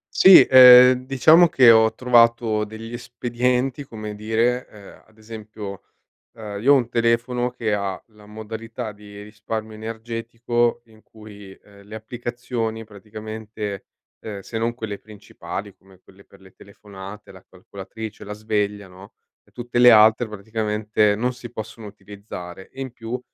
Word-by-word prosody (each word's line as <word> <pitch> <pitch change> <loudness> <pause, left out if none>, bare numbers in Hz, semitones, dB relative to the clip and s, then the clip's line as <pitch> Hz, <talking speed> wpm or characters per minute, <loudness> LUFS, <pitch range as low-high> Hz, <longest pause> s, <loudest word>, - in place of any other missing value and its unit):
Sì, 190 -1 +9
ehm, 125 0 +8
diciamo 155 +6 +5
che 130 -4 +5
ho 110 -1 +5
trovato 115 -3 +2
degli 110 +2 -10
espedienti, 125 +2 -2
come 110 -3 -8
dire, 115 +4 -1
ehm, 100 -2 -16
ad 110 - -28
esempio, 110 -2 -10 0.5
ehm, 105 -2 -8
io 140 +3 +5
ho - - +5
un 120 -3 -1
telefono 120 +1 0
che 110 -4 -3
ha 100 -2 -4
la 105 -1 -20
modalità 110 +2 -8
di 105 0 -14
risparmio 110 +1 -7
energetico 115 +2 -3
in 110 -1 -22
cui, 105 -2 -14
ehm, 100 +1 -19
le 105 +2 -13
applicazioni 120 0 -5
praticamente, 110 0 -8 0.3
ehm, 105 -2 -8
se 110 +3 -7
non 115 +1 -2
quelle 110 -4 -7
principali 105 -1 -9
come 95 -1 -22
quelle 95 +1 -21
per 100 - -21
le 95 -1 -19
telefonate, 100 0 -13
la 95 - -17
calcolatrice, 100 +4 -10
la 105 - -8
sveglia, 105 -1 -3
no, 95 +2 -16 0.3
e - - -30
tutte 120 0 -3
le 125 0 +8
altre 110 +1 +5
praticamente 105 0 -1
non 125 +4 -1
si 120 -1 -11
possono 110 -1 -9
utilizzare 100 -3 -11
e 135 - -12
in 130 -2 -6
più 120 +1 -6
110 Hz, 150 wpm, -21 LUFS, 105-120 Hz, 0.5 s, Sì